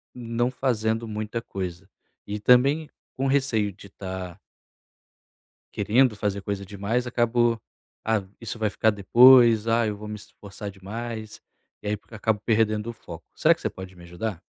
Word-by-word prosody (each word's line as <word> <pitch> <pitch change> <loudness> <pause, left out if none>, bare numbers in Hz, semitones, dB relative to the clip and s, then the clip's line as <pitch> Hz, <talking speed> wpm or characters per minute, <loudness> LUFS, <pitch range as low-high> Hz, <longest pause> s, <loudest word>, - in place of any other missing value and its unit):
não 120 0 -1
fazendo 115 -3 -1
muita 110 +2 -4
coisa. 95 -2 -6 0.4
E 105 +1 -4
também 135 +7 +4 0.3
com 135 +1 0
receio 125 -7 +1
de 100 +1 -14
tã 95 -2 -7 1.4
querendo 110 +3 +3
fazer 100 -1 -2
coisa 100 0 -4
demais 105 +5 -2
acabou: 120 -1 +1 0.4
"Ah 110 -2 +1 0.2
isso 115 0 -6
vai 110 -1 +1
ficar 110 +2 +2
depois, 115 +2 +6
ah, 115 0 +3
eu 105 - -2
vou 105 +1 -9
me 105 - -5
esforçar 100 -1 -9
demais". 110 +3 -7 0.4
E - - -9
aí 105 - 0
porque 105 - -17
acabo 110 -1 0
perdendo 110 -1 +1
o - - -6
foco. 85 -7 -11
Será - - +5
que - - -19
você - - -2
pode 95 0 -10
me 85 - -15
ajudar? 85 +2 -5
110 Hz, 160 wpm, -25 LUFS, 100-120 Hz, 1.4 s, depois